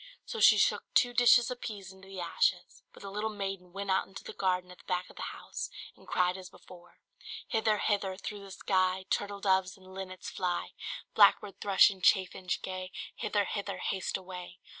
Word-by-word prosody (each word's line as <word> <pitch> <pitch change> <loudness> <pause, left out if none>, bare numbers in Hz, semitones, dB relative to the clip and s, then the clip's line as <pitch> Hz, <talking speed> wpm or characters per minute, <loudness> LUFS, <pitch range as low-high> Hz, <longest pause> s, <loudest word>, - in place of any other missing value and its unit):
So 460 - -5
she - - +8
shook - - +2
two 245 -1 +4
dishes 245 +1 +6
of 250 - -6
peas 195 -4 -6
into 190 0 -15
the 195 -1 -8
ashes; 175 +1 0
but - - -14
the 195 - -6
little 210 +2 -1
maiden 195 -3 -5
went 195 +1 -3
out 190 - +2
into 190 - -10
the - - -8
garden 180 -1 0
at 180 - -14
the - - -17
back 180 -1 -2
of - - -19
the - - -8
house, - - -6 0.3
and - - -20
cried 180 +1 +1
as 185 -1 -9
before 175 -1 -16 0.5
"Hither, 220 -2 +2
hither, 200 -3 0
through 205 +1 -6
the 200 - -11
sky. 185 -1 +1
Turtle 200 0 -1
doves 190 -1 +2
and 190 0 -15
linnets, 185 -1 -7
fly! 180 -2 -2 0.4
Blackbird, 200 -2 +5
thrush, 200 0 +6
and 190 -2 -11
chaffinch 185 -1 +2
gay, 185 0 -5 0.3
Hither, 205 -1 0
hither, 200 -2 -3
haste 190 0 -2
away! 180 -1 -9
190 Hz, 195 wpm, -31 LUFS, 185-200 Hz, 0.5 s, she